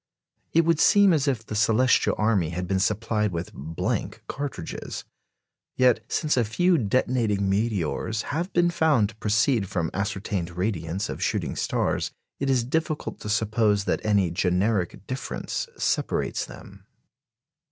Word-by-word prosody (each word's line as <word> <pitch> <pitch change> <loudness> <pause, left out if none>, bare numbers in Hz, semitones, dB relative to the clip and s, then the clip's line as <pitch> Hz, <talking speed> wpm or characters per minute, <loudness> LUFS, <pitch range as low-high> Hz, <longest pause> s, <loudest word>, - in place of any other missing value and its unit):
It 165 0 +4
would 165 -2 +2
seem 200 0 +6
as 145 -2 +1
if 120 -5 0
the - - -7
celestial 115 +4 +3
army 105 -7 +2
had 90 +1 -4
been 95 +1 +1
supplied 105 +1 0
with 85 0 -5
blank 80 +4 -3
cartridges. 140 - -5 0.7
Yet, 125 -2 +3
since 155 -1 +1
a 125 - +3
few 170 - +2
detonating 110 -3 +1
meteors 105 +1 -1
have 170 +5 -2
been 175 0 +3
found 150 -11 +3
to 110 - -13
proceed 110 0 +1
from 85 -5 -1
ascertained 100 -3 -3
radiants 90 -1 -2
of - - -6
shooting - - -1
stars, - - 0 0.3
it 140 - -1
is 130 -3 +3
difficult 155 +4 -2
to 105 - -6
suppose 105 -1 +2
that - - -1
any 100 -5 +2
generic 90 +2 0
difference 130 0 -4
separates - - -1
them. 100 +1 -13
110 Hz, 140 wpm, -25 LUFS, 95-130 Hz, 0.7 s, seem